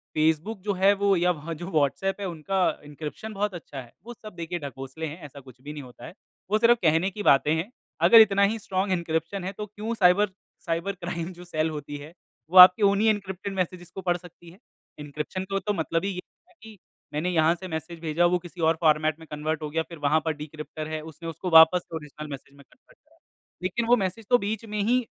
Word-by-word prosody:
Facebook 160 +7 +1
जो 205 +1 -1
है 195 +2 +4
वो 200 -1 +2
या 180 +1 +3
वह 165 0 -5
जो 175 +3 -7
व्हाट्सएप 160 +6 0
है, - - -2
उनका 180 +3 -2 0.2
एन्क्रिप्शन 150 +9 -7
बहुत 205 0 -1
अच्छा 150 -5 -8
है, 120 -2 -16
वो 240 - -8
सब 215 -4 -12
देखिए 170 +1 -4
ढकोसले 135 +2 -7
हैं 155 +4 -9
ऐसा 140 0 -11
कुछ 130 -2 -16
भी 145 +2 -8
नहीं 150 -2 -7
होता 125 -1 -13
है, 165 - -10 0.4
वो 215 - +4
सिर्फ़ 235 +1 +5
कहने 165 +3 +3
की 205 +2 -6
बातें 145 0 +4
हैं। 170 +8 -3 0.4
अगर 230 - +10
इतना 200 -2 +4
ही 215 +3 +1
स्ट्रांग 190 -1 -2
एन्क्रिप्शन 170 +1 -2
है, 190 - -3
तो 210 +1 -6
क्यों 210 +2 -5
साइबर 200 0 +4 0.4
साइबर 170 +4 -1
क्राइम 175 -1 -5
जो 175 0 -12
सेल 160 -2 -1
होती 145 -2 -6
है, 145 +3 -11 0.4
वो 185 - +1
आपके 180 +3 +10
उन्हीं 200 +2 +4
एन्क्रिप्टेड 200 -2 -3
मैसेजेज़ 180 -1 -3
को 190 - -5
पढ़ 175 -1 0
सकती 175 -1 -15
है। 175 - -16 0.4
एन्क्रिप्शन 150 +6 -5
तो 195 0 0
तो 210 +2 -2
मतलब 165 -1 -1
ही - - 0
ये 180 -1 -5 0.3
है - - -24
कि 220 -1 -12 0.4
मैंने 155 +5 -1
यहाँ 165 -1 +3
से 185 +2 -9
मैसेज 160 0 -6
भेजा 165 +1 +1
वो - - +4
किसी 175 0 -10
और 160 0 +3
फ़ॉर्मेट 155 0 +2
में 160 - -12
कन्वर्ट 155 +1 -3
हो 150 - -4
गया 160 +2 -1
फिर 170 - -9
वहाँ 150 +2 +2
पर 160 - 0
डिक्रिप्टर 155 +1 -8
है, 155 0 -4
उसने 160 +1 -8
उसको 165 +3 -5
वापस 160 +2 +8
से 165 - -10
ओरिजिनल 150 -1 -8
मैसेज 140 0 -9
में 140 - -15
कन्वर्ट - - -25
किया। - - -31 0.5
लेकिन 210 +6 -1
वो 245 - +6
मैसेज 200 +2 -3
तो 245 - +6
बीच 220 +1 -4
में 210 -1 -4
ही, 245 +5 +2
175 Hz, 230 wpm, -26 LUFS, 155-195 Hz, 0.5 s, अगर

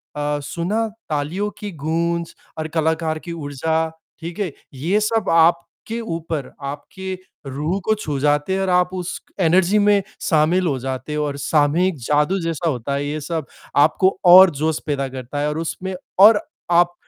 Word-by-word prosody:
अ, 145 0 -1
सुना, 195 +9 -1 0.2
तालियों 155 +8 -1
की 210 -1 -6
गूंज 170 +2 -2 0.2
और 155 - -3
कलाकार 160 0 0
की 170 - -5
ऊर्जा, 155 -1 -3 0.4
ठीक 170 +3 -7
है? 195 -6 -1 0.2
ये 170 +11 0
सब 215 -1 0
आपके 170 +7 +2
ऊपर 165 - -4 0.2
आपके 190 +7 -6 0.3
रूह 150 +8 -2
को 220 - +3
छू 150 -9 -4
जाते 145 +5 +1
हैं 195 - 0
और 190 - 0
आप 180 0 +3
उस 180 -1 -4 0.2
एनर्जी 185 +3 +4
में 205 -1 +4 0.2
शामिल 170 +2 +2
हो 140 - 0
जाते 130 +3 -4
हो 150 0 0
और 140 -1 -3
सामूहिक 155 +5 +2
जादू 150 +6 +2
जैसा 165 0 -1
होता 130 -1 -3
है 140 +1 -2
ये 150 +2 -3
सब। 160 +1 -3 0.4
आपको 185 +4 +1
और 185 +1 +10
जोश 160 0 +1
पैदा 140 -2 -1
करता 130 +2 -6
है 145 - 0
और 150 - -3
उसमें 185 +3 -4 0.2
और 205 +2 +8 0.3
आप 175 0 +4
165 Hz, 170 wpm, -21 LUFS, 150-185 Hz, 0.4 s, और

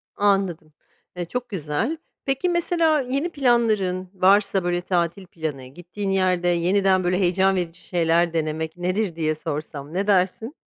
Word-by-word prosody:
Anladım, 195 -6 0 0.4
eee, 175 - -2
çok 245 +6 -4
güzel. 190 - -2 0.3
Peki, 270 +7 0
mesela, 335 -3 +2
yeni 275 +6 -2
planların, 220 - +1
varsa, 195 0 +3
böyle, 175 0 0
tatil 175 +1 -1
planı, 155 -6 -5
gittiğin 175 +8 -6
yerde 185 -2 +1
yeniden, 185 +2 +2
böyle, 180 +1 +1
heyecan 190 +1 +3
verici 175 -2 -3
şeyler 170 0 +1
denemek 160 0 -2
nedir 185 +1 -1
diye 155 -1 0
sorsam, 150 -1 -6
ne 195 +3 -1
dersin? 200 - +1
185 Hz, 140 wpm, -23 LUFS, 170-205 Hz, 0.4 s, varsa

